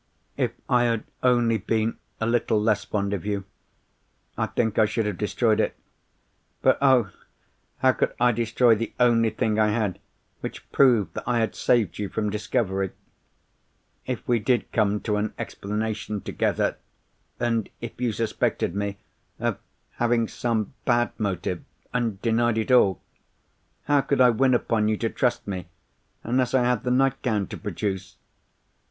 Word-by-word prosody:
"If - - 0
I 120 -1 +3
had 115 -2 0 0.2
only 120 -3 +3
been 110 +3 -1 0.2
a 115 - 0
little 115 -2 +2
less 105 -1 +1
fond 100 -1 -1
of 100 - -3
you, 100 -1 -2 0.9
I - - -1
think 110 -3 0
I 110 - +6
should 110 +1 -1
have 105 -4 -3
destroyed 110 +1 +1
it. - - +1 0.9
But - - +4
oh! 130 -7 +4 0.7
how 130 - +4
could - - -1
I 120 0 +5
destroy 115 +1 +3
the 115 +1 -2
only 115 -2 +4
thing 110 -1 0
I 110 - +4
had 105 -3 -1 0.4
which - - -8
proved 120 -7 +4
that - - -5
I 125 - +2
had 115 -1 0
saved 110 -8 +1
you 100 -2 -2
from 105 -2 -2
discovery? 100 -3 -1 1.1
If 125 -2 -4
we 120 -2 +3
did 120 +2 0
come 105 -2 +1
to 105 -2 -1
an 105 0 -2
explanation 105 0 -3
together, - - 0 0.6
and 115 -3 0
if 120 +1 -8
you 120 -2 +1
suspected 110 -5 -1
me 100 0 -3 0.4
of - - -1 0.4
having 120 -1 +2
some 115 -2 -2
bad 120 -1 +2
motive, 95 -4 -2 0.3
and 115 -5 -1
denied 115 0 +2
it 110 +3 -1
all, 100 -7 +4 0.8
how 145 -1 +3
could 135 0 0
I 125 -1 +7
win 130 +2 +3
upon 115 -3 +1
you 110 0 +1
to 115 - -1
trust 125 -5 0
me, 95 -3 -4 0.6
unless 125 +1 +1
I 130 - +4
had 125 0 +1
the - - +1
nightgown 125 -5 +1
to - - -6
produce? 95 -2 -4
115 Hz, 160 wpm, -25 LUFS, 105-120 Hz, 1.1 s, I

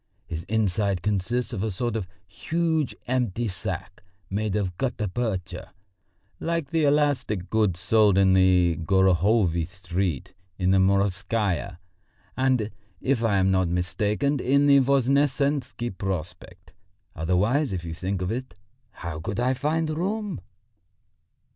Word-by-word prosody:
His 80 0 -6
inside 100 -3 0
consists 105 +5 -1
of 100 - -3
a 110 - -1
sort 115 +4 -2
of 105 -5 -3 0.2
huge 160 - -1
empty 120 -3 -1
sack 95 -1 -6 0.3
made 105 0 -1
of 95 -4 -1
gutta 120 -5 -1
percha, 95 -5 -4 0.7
like 165 -4 -2
the 165 -2 +2
elastic 140 -10 +1
goods 105 -6 +1
sold 105 +1 +4
in 95 -1 +5
the 90 -3 +4
Gorohovy 95 0 +2
Street, 90 -4 -3 0.2
in 95 -1 +1
the 95 - +4
Morskaya, 100 -1 0 0.6
and, 130 -5 +1 0.3
if 130 -3 0
I 105 -4 +2
am 95 0 +3
not 95 -1 +2
mistaken, 105 +10 0
in 140 +3 +3
the 140 -1 +6
Voznesensky 140 -2 +1
Prospect. 90 -2 -6 0.4
Otherwise, 100 - +1
if 90 -3 -4
you 80 - -5
think 95 +2 -3
of 90 - -2
it, 125 -4 -5 0.3
how 85 -3 -7
could 100 +6 -4
I 125 +2 +2
find 155 +5 0
room?" 195 - -2
105 Hz, 130 wpm, -25 LUFS, 90-130 Hz, 0.7 s, the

